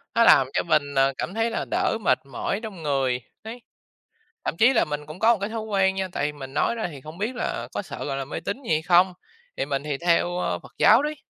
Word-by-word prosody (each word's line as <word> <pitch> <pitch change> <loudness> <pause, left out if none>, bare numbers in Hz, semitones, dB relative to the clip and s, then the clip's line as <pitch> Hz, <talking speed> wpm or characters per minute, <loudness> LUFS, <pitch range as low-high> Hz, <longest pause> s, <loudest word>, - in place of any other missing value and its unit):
nó 230 - +5
làm 135 - +6
cho - - +1
mình, 145 -4 +1
ờ, 135 0 +3
cảm 180 - -4
thấy 225 +2 0
là 230 - -3
đỡ 360 -7 +1
mệt - - +3
mỏi 140 +9 -3
trong 195 -7 -7
người, 135 -4 0 0.2
đấy. 230 +3 -8 0.8
Thậm - - -1
chí 240 +4 +6
là 240 - +3
mình 150 0 -5
cũng 155 +3 -9
có 225 +3 +4
cái 200 +1 -3
thói 225 0 -3
quen 195 -3 +1
nha, 190 -1 -2
tại 150 -3 -1
mình 135 -2 -9
nói 190 - +1
ra 225 -5 -3
thì 145 -4 -10
không 155 +5 -11
biết 220 +6 -2
là 240 - -3
có - - -3
sợ, - - -7
gọi 135 -1 -3
là, 135 - -3
mê 140 - -5
tín 205 +8 -4
gì 245 - -6
hay 155 0 +1
không? 180 +2 +4 0.4
Thì - - -1
mình 140 -1 -2
thì 150 -1 -2
theo, 175 +1 +1
ơ, - - -1
Phật - - -15
giáo 225 +5 +6
đấy. 300 +1 -2
180 Hz, 260 wpm, -24 LUFS, 145-220 Hz, 0.8 s, làm